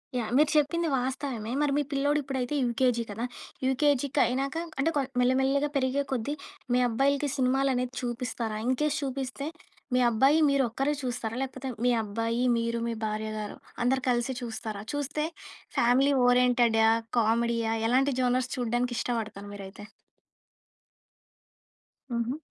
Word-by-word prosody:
Yeah. 230 -3 -1
మీరు 300 0 +5
చెప్పింది 330 +3 +2
వాస్తవమే. 250 -3 -3
మరి 295 -1 +2
మీ 295 - +2
పిల్లోడు 285 +2 +2
ఇప్పుడైతే 265 0 -2
యూకేజీ 240 -1 +1
కదా? 225 +4 -3 0.4
యూకేజీకి 280 +1 +2
అయినాక 270 +4 -1 0.2
అంటే 315 +4 +3
కొ 285 - +3 0.2
మెల్లమెల్లగా 265 +3 +2
పెరిగే 270 +1 +1
కొద్దీ 260 +2 -1 0.4
మీ 250 - +4
అబ్బాయిలకి 280 +4 +1
సినిమాలనేవి 255 -1 +1
చూపిస్తారా? 240 -2 -3
ఇన్‌కేస్ 295 +3 +1
చూపిస్తే, 270 +1 -3 0.5
మీ - - +4
అబ్బాయి 270 +7 +4
మీరు 275 -1 +3
ఒక్కరే 270 +5 0
చూస్తారా? 235 -2 -3
లేకపోతే 265 0 -4 0.2
మీ 250 - +5
అబ్బాయి, 230 +3 -2 0.2
మీరు, 230 0 -1
మీ 235 - -1
భార్యగారు, 215 0 -4 0.3
అందరూ 260 +2 +2
కలిసి 240 +1 0
చూస్తారా? 220 -3 -5
చూస్తే, 290 +1 -2 0.5
ఫ్యామిలీ 260 +4 +4 0.2
ఓరియెంటెడా? 240 -3 +4 0.3
కామెడీయా? 230 0 +1
ఎలాంటి 265 +3 +3
జోనర్స్ 255 0 +1
చూడడానికి 240 0 -1
ఇష్టపడతారు 220 -4 -3
మీరైతే? 200 +1 -9 2.2
హుహు. 235 +3 -1
250 Hz, 125 wpm, -28 LUFS, 230-275 Hz, 2.2 s, మీరు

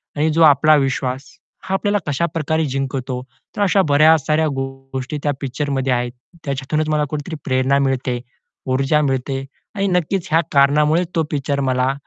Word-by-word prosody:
आणि 155 +2 +1
जो 165 - +2
आपला 155 +1 +6
विश्वास 135 -1 -1 0.4
हा 190 - -4
आपल्याला 205 +1 +1
कशाप्रकारे 160 +1 -1
जिंकवतो. 130 -2 -3 0.3
तर - - -3
अशा 195 0 +3
बऱ्या 155 +3 +6
साऱ्या 155 +2 +1
गोष्टी 135 +2 -5
त्या 145 - +1
पिक्चरमध्ये 135 -1 -1
आहेत. 120 0 -1 0.3
त्याच्यातूनच 140 +3 -2
मला 150 -1 +1
कुठेतरी 150 +2 -5
प्रेरणा 130 +1 +2
मिळते, 125 -2 -1 0.5
ऊर्जा 135 +3 +1
मिळते 135 -1 -1 0.3
आणि 200 -1 0
नक्कीच 180 +1 0
ह्या 165 - +4
कारणामुळे 150 +4 +4
तो 165 - +2
पिक्चर 140 -1 -1
मला 130 +1 +1
140 Hz, 150 wpm, -19 LUFS, 135-155 Hz, 0.5 s, आपला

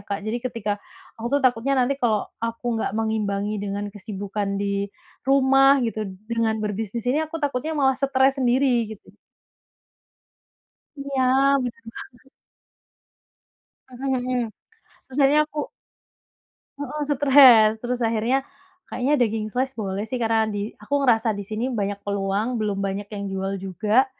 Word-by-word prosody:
Kak. 200 - -2
Jadi 230 +3 -1
ketika 230 -4 -2 0.5
aku 235 - -3
tuh - - -6
takutnya 250 +1 +2
nanti 250 +3 +2
kalau 220 -4 +2 0.2
aku 230 +1 -5 0.2
enggak - - -1
mengimbangi 210 -2 -1
dengan 205 0 -3
kesibukan 205 0 -4
di 200 0 -1 0.4
rumah 270 0 +5
gitu 225 -1 -2 0.3
dengan 230 -1 +1
berbisnis 210 +2 -3
ini, 290 +5 +2
aku 315 - -6
takutnya 285 +2 -1
malah 265 -1 +4
stres 270 0 +2
sendiri 260 +2 +3 0.2
gitu. 215 - -11 1.9
Iya, 275 -1 -1 0.4
benar 250 +4 -6
banget. 255 +2 -12 1.6
Mhm. 250 -2 -2 0.6
Terus 265 +1 -7
akhirnya 280 +2 +5
aku 300 -1 -4 1.1
Heeh, 290 +1 -5
stress. 265 -6 +7
Terus 245 0 -2
akhirnya 230 +5 0 0.4
kayaknya 275 +4 0
daging 220 -2 0
slice 260 +4 -1
boleh 200 -3 -3
sih 245 +2 -4
karena 225 -1 +2
di 205 0 -3
aku 210 +7 -7
ngerasa 225 -4 +3
di 205 - -5
sini 220 +6 -3
banyak 200 -2 -2
peluang, 200 +4 -1
belum 205 -2 -1
banyak 195 +1 -4
yang 200 -2 -5
jual 195 +1 -2
juga 210 +7 +1
230 Hz, 135 wpm, -23 LUFS, 205-265 Hz, 1.9 s, stress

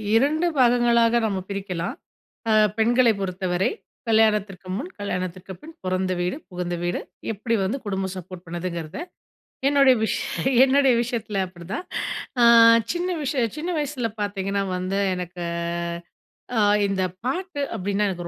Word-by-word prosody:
2 300 +8 +3
பாகங்களாக 240 -1 +4
நம்ம 200 -3 -1
பிரிக்கலாம், 190 -4 -3 0.6
அ - - +4 0.3
பெண்களை 235 +1 +4
பொறுத்தவரை, 185 -1 -1 0.4
கல்யாணத்திற்கு 210 -4 +2
முன், 285 - -5
கல்யாணத்திற்கு 185 -1 -4
பின். 320 +1 -11
பொறந்த 185 0 0
வீடு, 180 +7 -1
புகுந்த 180 -1 -3
வீடு. 175 - -1 0.3
எப்டி 225 +2 -1
வந்து 220 +9 -1
குடும்பம் 190 -1 -2
சப்போர்ட் 180 0 -9
பண்ணுதுங்கிறத, 170 - -5 0.7
என்னோடைய 275 -2 +6
விஷ் 220 - 0 0.5
என்னோடைய 270 -1 +4
விஷயத்துல 220 -5 -2
அப்டிதான். 180 - -7 0.6
அ, - - +5 0.5
சின்ன 350 +1 -1
விஷயம் 255 -5 0
சின்ன 340 +4 -3
வயசில 270 -6 -2
பார்த்தீங்கன்னா 200 -1 -1
வந்து 185 +2 -1
எனக்கு 180 -1 -6 1.2
அ, - - +4 0.3
இந்த 195 -1 0 0.2
பாட்டு 355 +3 -2
அப்டின்னா 205 0 0
எனக்கு 175 -2 -5
200 Hz, 125 wpm, -24 LUFS, 185-245 Hz, 1.2 s, என்னோடைய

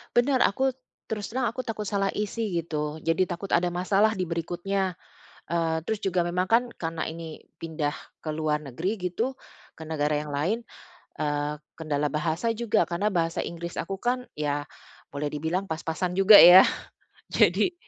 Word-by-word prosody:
Benar, 255 +2 +4
aku 265 +7 +2 0.4
terus 215 0 -4
terang 255 -3 +1
aku 250 +2 -5
takut 215 -3 -4
salah 195 -1 0
isi, 210 -1 -2
gitu. 150 -1 -4
Jadi 165 +4 +2
takut 180 +2 -6
ada 175 0 +2
masalah 195 +4 +2
di 185 -4 -3
berikutnya, 180 +3 -2 0.5
eee, 165 -1 0
terus 220 -1 -2
juga 180 -2 +1
memang 180 +2 0
kan 230 +2 +5
karena 165 -1 -3
ini 160 -1 -7 0.2
pindah 155 -3 -2 0.2
ke 155 - -5
luar 155 -1 0
negeri, 160 - -3
gitu, 240 +9 -2 0.4
ke 160 - -8
negara 150 -1 0
yang 150 -1 -5
lain, 180 +11 0 0.6
eee, 145 0 -1 0.2
kendala 150 -2 -1
bahasa 160 +8 -1
juga 230 -3 +1
karena 180 +5 -1
bahasa 165 -1 0
Inggris 170 0 -6
aku 195 +2 -3
kan, 250 +1 0
ya, 145 -1 -1 0.5
boleh 145 0 -2
dibilang 160 +6 -2
pas-pasan 160 +3 -2
juga 205 +2 +9
ya, 180 +2 +11 0.7
jadi 360 - +3
175 Hz, 160 wpm, -26 LUFS, 155-205 Hz, 0.7 s, ya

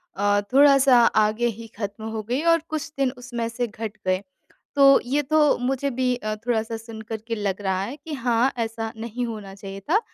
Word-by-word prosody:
अ, 205 +1 +2
थोड़ा-सा 275 -2 +6 0.3
आगे 215 +3 +1
ही 230 0 -5
ख़त्म 205 0 -5
हो 220 -1 -3
गई 260 +5 0
और 330 - +3
कुछ 310 0 -4
दिन 270 -2 +2
उसमें 240 -2 -4
से 240 +1 -2
घट 220 0 -6 0.2
गए, 185 +1 +2 0.5
तो 275 -1 +7
ये 280 +4 0
तो 300 +1 +3
मुझे 270 +2 -1
भी 250 0 0
अ, 215 -2 -3
थोड़ा-सा 225 -1 0
सुन 225 0 -9
कर 220 0 -5
के 230 - 0
लग 205 -2 -2
रहा 190 -1 0
है 250 +8 -5
कि 305 +1 -10
हाँ, 245 0 +1
ऐसा 225 -1 -3
नहीं 235 +2 -4
होना 210 -4 -7
चाहिए 195 0 -8
था। 415 - +5
230 Hz, 200 wpm, -24 LUFS, 215-265 Hz, 0.5 s, तो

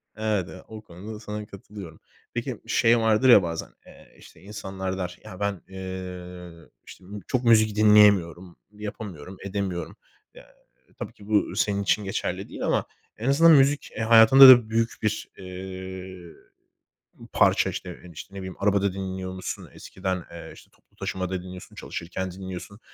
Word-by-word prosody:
evet, 105 -4 -1
e, 95 - -11
o 110 -1 -10
konuda 100 +2 -10
da - - -10
sana 105 -1 -6
katılıyorum. 100 -4 -11 0.3
Peki - - -4
şey 115 +1 +3
vardır 110 +3 +3
ya 105 -6 +8
bazen, 85 -1 -4 0.2
eee, - - -18
işte - - -17
insanlar 95 -1 -5
der, 90 -1 -5
ya, 90 - -10
ben, 100 -3 -2
eee, 90 -2 -8 0.3
işte, - - -14
m 105 +2 -8
çok 125 -1 -1
müzik 110 -3 +4
dinleyemiyorum, 100 -5 +4 0.2
yapamıyorum, 100 -5 -8
edemiyorum. 95 -3 -4 0.4
Eee, - - -14 0.5
tabii - - -6
ki 100 - -16
bu 105 -1 +1
senin 100 -1 0
için 105 +2 +1
geçerli 95 - -4
değil - - -5
ama - - +1 0.3
en 115 +5 -2
azından 165 +4 +6
müzik, 145 0 +3
e, - - -4
hayatında 115 +4 +9
da 120 -4 +8
büyük 115 0 +1
bir, 105 0 -2
eee, 95 -1 -8 1.0
parça, - - +3
işte, - - -6
e, 90 - -12
işte, 90 +5 -11
ne - - -7
bileyim 95 -1 -7
arabada 100 -1 +1
dinliyormuşsun. 95 -1 -6
Eskiden, 95 -2 -4
eee, 85 0 -10
işte, - - -17
toplu - - -33
taşımada 95 -1 -4
dinliyorsun, 90 0 -11
çalışırken 95 +2 -5
dinliyorsun. 95 +3 -8
95 Hz, 155 wpm, -25 LUFS, 95-105 Hz, 1.0 s, hayatında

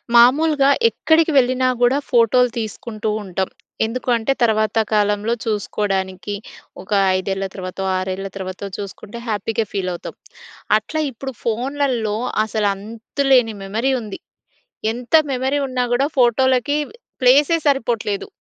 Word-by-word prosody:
మామూలుగా 275 +4 +5 0.2
ఎక్కడికి 320 -5 +2
వెళ్ళినా 255 0 +3
గూడా 245 +3 +4
ఫోటో‌లు 245 +1 +4
తీసుకుంటూ 220 0 -4
ఉంటాం. 190 -1 -2 0.4
ఎందుకు 250 +3 -4
అంటే, 230 +3 0
తరువాత 215 -1 +2 0.2
కాలంలో 210 +1 +1
చూసుకోడానికి 200 -2 -2 0.5
ఒక 190 - -15 0.3
5ఏళ్ల 195 +1 -2
తర్వా‌తో 185 0 -5
6ఏళ్ల 190 +1 -3
తర్వా‌తో 190 +1 -5
చూసుకుంటే 205 +3 -8
హ్యాపీ‌గా 220 +1 -1
ఫీల్ 190 -2 -2
అవుతాం. 175 - -7 0.6
అట్లా 265 +9 -4
ఇప్పుడు 265 +3 -6
ఫోన్‌లలో 245 -2 -1 0.3
అసలు 215 -1 0
అంతులేని 230 +3 0
మెమరీ 225 +7 -1
ఉంది. 210 -3 -7 0.7
ఎంత 245 +5 -7 0.2
మెమరీ 265 +2 0
ఉన్న 255 -1 -6
గూడా 265 +4 +2
ఫోటోలకి 260 +3 +3 0.4
ప్లేస్ 275 +5 +5
సరిపోవట్లేదు. 230 -7 0
225 Hz, 115 wpm, -20 LUFS, 205-255 Hz, 0.7 s, మామూలుగా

